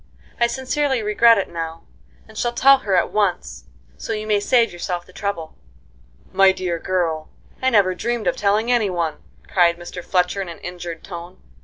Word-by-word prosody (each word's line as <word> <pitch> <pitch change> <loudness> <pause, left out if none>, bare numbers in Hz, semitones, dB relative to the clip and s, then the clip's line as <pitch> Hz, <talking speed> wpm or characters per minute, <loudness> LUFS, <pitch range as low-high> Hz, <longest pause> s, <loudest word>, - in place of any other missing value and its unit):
I 235 - +4
sincerely 265 0 -1
regret 225 +2 +5
it 195 - -1
now, 165 -1 -6 0.4
and - - -16
shall 240 0 -1
tell 275 +2 +6
her 200 -7 0
at 180 - +2
once, 175 - -1 0.3
so - - -3
you 215 0 -4
may 210 -1 +2
save 230 +1 +2
yourself 175 0 -4
the 185 - -19
trouble." 170 -6 -4 0.8
"My 195 0 +5
dear 180 -3 -3
girl, 165 -4 -1 0.3
I 260 - +3
never 200 -6 +3
dreamed 235 +4 -2
of - - +1
telling 210 +4 +1
any 230 -5 +2
one!" 170 -4 -2 0.3
cried 170 -2 +3
Mr. 175 +1 -8
Fletcher 180 +1 0
in 185 - -5
an 170 - -8
injured 175 -2 -7
tone. 175 0 -9
190 Hz, 180 wpm, -21 LUFS, 175-225 Hz, 0.8 s, tell